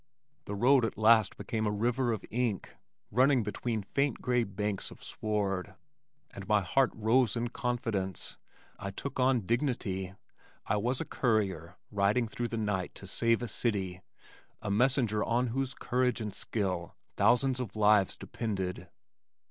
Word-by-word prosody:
The 105 - -4
road 125 +5 +5
at 115 - -2
last 110 -1 +5
became 110 -2 -2
a - - +1
river 120 +4 +1
of 110 -4 -3
ink 115 -5 -1 0.4
running 130 +2 +4
between 110 +1 -2
faint 140 +5 0
gray 125 -1 +1
banks 100 -1 -3
of - - -13
sward, 100 -3 -2 0.6
and 100 -1 -9
my 105 -1 +4
heart 130 +7 +2
rose 115 +1 +3
in 120 0 -1
confidence. 115 -7 -2 0.4
I 100 - -4
took 130 +7 -5
on 130 -1 +3
dignity. 100 -5 -1 0.5
I 105 - +1
was 125 +5 0
a - - -3
courier 95 - 0
riding 105 +4 +2
through 120 +2 -3
the 115 - -4
night 100 -4 -2
to - - -8
save 115 +4 +1
a - - -2
city, 95 -5 -1 0.6
a 100 - -3
messenger 115 -1 +2
on 120 +1 +1
whose 135 0 -1
courage 125 0 0
and 105 -3 -4
skill 95 -7 -2 0.2
thousands 130 +1 +3
of 115 -5 -5
lives 105 -2 +4
depended. 95 -5 -4
110 Hz, 150 wpm, -31 LUFS, 100-125 Hz, 0.6 s, road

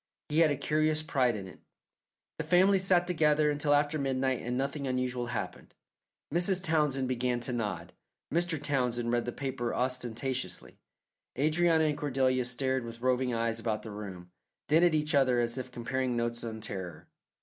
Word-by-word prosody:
He 150 +2 +1
had 165 -2 +6
a 145 - +1
curious 155 +2 +1
pride 130 -7 +1
in 100 -2 -6
it. 90 - -13 0.8
The - - -1
family 190 +2 +4
sat 185 -2 +3
together 155 -3 +3
until 145 0 0
after 145 +1 +1
midnight 130 -2 0
and 125 +1 -2
nothing 140 +1 -2
unusual 125 -1 -1
happened. 120 - -5 0.6
Mrs. 180 +2 +2
Townsend 150 -6 +1
began 125 -1 0
to 125 +1 -2
nod; 105 -8 -3 0.4
Mr. 170 -1 +1
Townsend 125 -4 0
read 120 -1 +1
the 120 - -2
paper 125 -3 -3
ostentatiously. 125 -4 -3 0.6
Adrianna 160 +3 +3
and 150 - -2
Cordelia 130 -3 +1
stared 130 +1 0
with 115 0 -9
roving 130 0 +1
eyes 115 -1 0
about 110 -2 -2
the 110 - -7
room, 95 -4 -8 0.4
then 160 +3 +5
at 175 -3 +4
each 155 +1 0
other 130 -3 +4
as 120 0 0
if 130 0 -6
comparing 125 +1 -2
notes 120 0 -2
on 110 -1 -5
terror. 95 -4 -6
130 Hz, 170 wpm, -30 LUFS, 120-150 Hz, 0.8 s, had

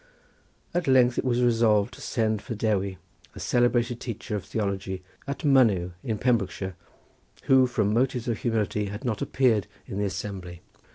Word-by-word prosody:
At 175 -2 -1
length 125 -2 +4
it - - 0
was 125 -1 +1
resolved 115 -4 +3
to - - -12
send 110 -3 0
for 115 - -5
Dewi, 100 -3 0 0.4
a - - -8
celebrated 120 -1 +1
teacher 115 -2 -5
of 100 - -3
theology 95 -3 -3 0.2
at 140 +3 -4
Mynyw 110 -11 +4
in 110 -2 -2
Pembrokeshire, 100 -6 0 0.7
who 130 -1 +5
from 105 -4 0
motives 125 0 +1
of 115 -2 -1
humility 105 -3 0
had 105 +3 -6
not 110 -4 -1
appeared 115 -8 +2 0.2
in 95 - -5
the 105 - +1
assembly. 95 -2 -5
110 Hz, 160 wpm, -26 LUFS, 100-125 Hz, 0.7 s, who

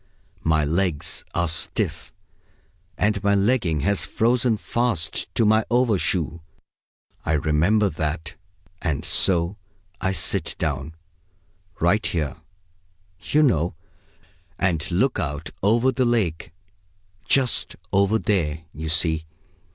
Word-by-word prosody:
My 80 -1 +2
legs 85 0 -1
are 85 0 +1
stiff, 80 - 0 0.9
and 105 -1 +1
my 100 0 +3
legging 100 - +1
has 100 +5 +1
frozen 120 0 +1
fast 105 -10 -1
to 115 - +3
my 110 +1 +4
overshoe; 95 - +1 0.8
I 80 - 0
remember 80 +8 +2
that. 80 -1 -3 0.5
And 80 -5 -2
so 85 +1 +2 0.4
I 95 - +1
sit 90 -4 0
down 75 0 -3 0.8
right 95 +6 +2
here, 75 -5 -2 0.8
you 150 +1 +2
know 85 - +1 0.8
and 85 -5 0
look 105 +8 +1
out 75 -5 -4
over 115 +6 +3
the 130 -1 0
lake 105 -12 0 0.7
just 130 -3 +1 0.2
over 100 +3 +3
there, 85 -8 -1
you 80 +2 -5
see. 80 0 +2
90 Hz, 110 wpm, -23 LUFS, 80-110 Hz, 0.9 s, my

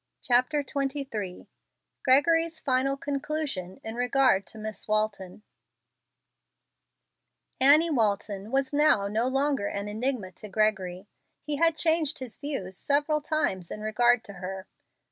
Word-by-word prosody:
CHAPTER 255 +4 +2
XXIII 270 -9 -4 0.6
GREGORY'S 330 +5 +3
FINAL 270 0 0
CONCLUSION 280 - -4
IN 220 - -4
REGARD 245 -5 +2
TO - - -12
MISS 215 0 -6
WALTON 215 -2 -2 2.2
Annie 300 +5 +7
Walton 205 -4 -1
was 270 +2 -1
now 285 -9 +4
no 220 +4 0
longer 270 -4 0
an 200 0 -4
enigma 220 -2 -2
to 210 +3 -11
Gregory. 195 -3 0 0.4
He 295 -1 -2
had 330 +1 +3
changed 320 -1 +2
his 255 -4 -7
views 270 -11 -3
several 295 +2 +1
times 240 - -1
in 210 - -7
regard 240 +2 +2
to 200 - -11
her. 190 0 -6
250 Hz, 125 wpm, -27 LUFS, 205-290 Hz, 2.2 s, Annie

